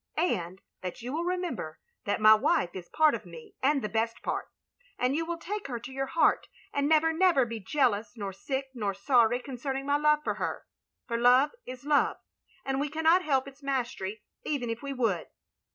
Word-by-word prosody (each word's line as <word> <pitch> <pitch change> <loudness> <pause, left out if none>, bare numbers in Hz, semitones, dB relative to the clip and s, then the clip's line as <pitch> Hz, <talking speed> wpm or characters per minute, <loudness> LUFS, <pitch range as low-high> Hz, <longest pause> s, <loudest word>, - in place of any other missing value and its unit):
''And 185 - 0 0.2
that 185 +5 -6
you 250 +3 -4
will 335 +3 -1
remember 350 - -3 0.3
that 205 - 0
my 215 0 +8
wife 180 -4 +2
is 180 -2 -8
part 310 -1 +4
of - - -4
me 460 -4 -12
and 275 0 +2
the - - 0
best 225 +1 -2
part.... - - -2 0.5
and 250 +2 +1
you 325 - 0
will 340 0 -2
take 400 +4 -5
her 240 -3 -4
to 255 - -9
your 270 +1 -2
heart, 330 - +2 0.3
and 285 0 +1
never, 320 +1 +4
never 335 -6 +4
be 230 -1 -5
jealous 220 -1 0
nor 200 -2 -4
sick 265 +7 -3
nor 205 -5 -2
sorry 240 +2 +3
concerning 270 +1 -4
my 285 +1 +2
love 300 0 +3
for - - 0
her; - - -3 0.4
for 235 -2 -1
Love 250 +4 +5 0.2
is 255 +1 -8
Love, 295 -1 +3 0.5
and 270 0 -1
we 290 +1 -1
cannot 320 +4 +4
hel{> 275 -6 +1
its 275 +1 -13
mastery 240 -7 -3 0.2
even 255 -6 -2
if 230 - -5
we 280 - -5
would. 225 -10 0
265 Hz, 200 wpm, -29 LUFS, 230-300 Hz, 0.5 s, my